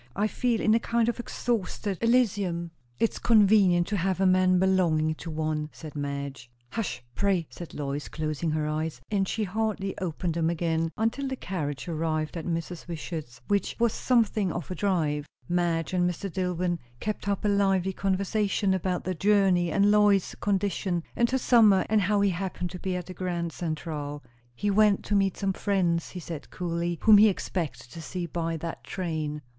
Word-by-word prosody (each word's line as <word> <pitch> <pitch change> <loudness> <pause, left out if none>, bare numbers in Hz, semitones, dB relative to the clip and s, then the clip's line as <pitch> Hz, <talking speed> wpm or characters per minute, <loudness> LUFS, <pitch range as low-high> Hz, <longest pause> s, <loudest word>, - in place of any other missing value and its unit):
I 205 - +1
feel 235 +1 0
in 215 - +4
a 230 - +4
kind 235 0 +1
of 240 - -3
exhausted 210 -5 -2
Elysium!" 200 -8 +1 0.3
"It's 230 - 0
convenient 200 -6 +5
to 210 - 0
have 185 +1 0
a 195 - +3
man 185 0 +4
belonging 175 -4 +2
to 165 +2 -8
one," 155 -1 -2
said 155 -2 -10
Madge. 140 -3 -4 0.2
"Hush, 225 - -3
pray!" 195 -2 +1
said 175 - -9
Lois, 145 0 -3
closing 155 +1 -2
her 155 0 0
eyes. 155 -3 -2
And 195 -2 +1
she 220 - -1
hardly 210 -1 -2
opened 175 -1 -2
them 165 0 +1
again 165 -1 0
until 230 +5 0
the 265 - -2
carriage 155 - -4
arrived 155 -1 -1
at 165 -1 -5
Mrs. 165 0 -4
Wishart's, 155 -6 -6
which 200 -1 0
was 235 -1 +2
something 220 -6 +2
of 170 0 -5
a - - 0
drive. 155 -6 0 0.2
Madge 175 -1 0
and 180 -1 +2
Mr. 180 +1 -5
Dillwyn 180 -2 -1 0.2
kept 215 -1 -4
up 200 +1 -1
a - - +4
lively 195 -2 +2
conversation, 195 +1 0
about 185 -1 -1
the 185 - -2
journey 190 -2 +3
and 200 +3 +4
Lois's 205 -2 +4
condition, 195 -3 0
and 235 0 +2
her 265 - +1
summer; 225 -6 +5
and 215 -1 +3
how 200 +2 +2
he 200 -1 +3
happened 180 -1 -3
to 180 - -7
be 185 0 -2
at 180 -1 -4
the 185 - -8
Grand 175 -2 -3
Central. 150 -3 -4 0.3
He 205 +10 0
went 210 0 +4
to 205 - 0
meet 195 -2 +2
some 195 -1 0
friends, 180 -5 0
he 180 - -7
said 165 -3 -7
coolly, 170 -1 -2
whom 215 -2 +8
he 215 +1 +7
expected 170 - -4
to 165 - -8
see 175 +3 -4
by 165 -1 -2
that 165 +1 -6
train. 155 -5 -3
180 Hz, 185 wpm, -27 LUFS, 165-200 Hz, 0.3 s, whom